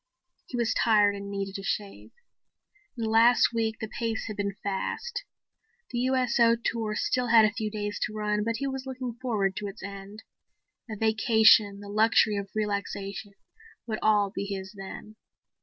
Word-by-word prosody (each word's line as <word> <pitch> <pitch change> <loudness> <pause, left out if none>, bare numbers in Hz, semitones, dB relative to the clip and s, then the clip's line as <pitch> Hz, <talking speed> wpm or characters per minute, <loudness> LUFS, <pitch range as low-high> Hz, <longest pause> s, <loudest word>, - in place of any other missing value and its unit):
He 250 - -5
was 235 -2 +1
tired 210 -2 +4
and 200 0 -7
needed 195 0 -4
a - - -8
shave. 200 0 -4 0.9
In 230 - -3
the 220 - -1
last 235 +2 +5
week 225 -1 -1
the 220 - -4
pace 225 0 -3
had 215 - -5
been 200 -1 -2
fast. 340 - -3 0.7
The 240 - -2
USO 245 -2 +3
tour 225 -2 -2
still 250 +3 0
had 225 -1 +7
a 210 - +2
few 220 -2 -3
days 205 -1 -4
to 215 - -10
run, 210 0 0
but 230 +1 -1
he 275 - -3
was 265 -1 -4
looking 255 -2 -5
forward 205 -7 0
to 205 - -3
its 200 +1 -9
end. 200 +2 -9 0.7
A 215 - -4
vacation, 220 -2 +4
the 205 - -10
luxury 215 +1 +3
of 200 -1 -4
relaxation 200 -1 -3 0.5
would 220 -2 -3
all 210 -2 +3
be 200 - -4
his 195 0 -6
then. 200 +2 -9
215 Hz, 175 wpm, -27 LUFS, 200-230 Hz, 0.9 s, had